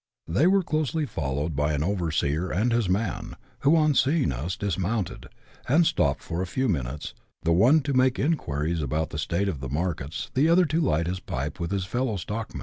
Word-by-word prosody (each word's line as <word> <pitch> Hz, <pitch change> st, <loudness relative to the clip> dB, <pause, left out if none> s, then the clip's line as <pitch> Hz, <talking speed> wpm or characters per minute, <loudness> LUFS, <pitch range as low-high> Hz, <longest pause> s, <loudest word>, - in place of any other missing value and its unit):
Tliey 110 Hz, -, +3 dB
were 195 Hz, 0 st, +3 dB
closely 155 Hz, -1 st, -1 dB
followed 75 Hz, -, -3 dB
by 75 Hz, +2 st, +1 dB
an 75 Hz, -, -1 dB
overscHT 85 Hz, -2 st, 0 dB
and 115 Hz, +4 st, +2 dB
his 115 Hz, -5 st, +1 dB
man, 105 Hz, +4 st, -2 dB, 0.2 s
who, 145 Hz, +4 st, +4 dB
on 155 Hz, -2 st, +4 dB
seeing 140 Hz, -, +2 dB
us, 75 Hz, +9 st, -3 dB
dismounted, 100 Hz, 0 st, -2 dB, 0.4 s
and 165 Hz, +6 st, +5 dB
stopped 70 Hz, -, +1 dB
for 85 Hz, +2 st, -3 dB
a -, -, -1 dB
ihw 130 Hz, +7 st, -1 dB
mimites, 70 Hz, -, -3 dB, 0.3 s
tiie 85 Hz, -, +4 dB
one 125 Hz, -, +5 dB
to 140 Hz, 0 st, -2 dB
make 130 Hz, 0 st, +3 dB
inquiries 80 Hz, -, -1 dB
about 75 Hz, +3 st, -1 dB
the 75 Hz, -, -4 dB
state 85 Hz, +6 st, 0 dB
of 85 Hz, -8 st, -2 dB
the 65 Hz, -1 st, -5 dB
markets, 80 Hz, 0 st, -3 dB
the 140 Hz, +5 st, +3 dB
otiier 170 Hz, +1 st, +5 dB
to 160 Hz, +4 st, +1 dB
light 85 Hz, -, +1 dB
his 90 Hz, +2 st, -2 dB
pipe 75 Hz, -3 st, -4 dB
with 85 Hz, -1 st, -2 dB
his 95 Hz, -1 st, -1 dB
fellow 120 Hz, +1 st, -1 dB
stockma!!. 105 Hz, +4 st, -5 dB
95 Hz, 200 wpm, -26 LUFS, -, 0.4 s, and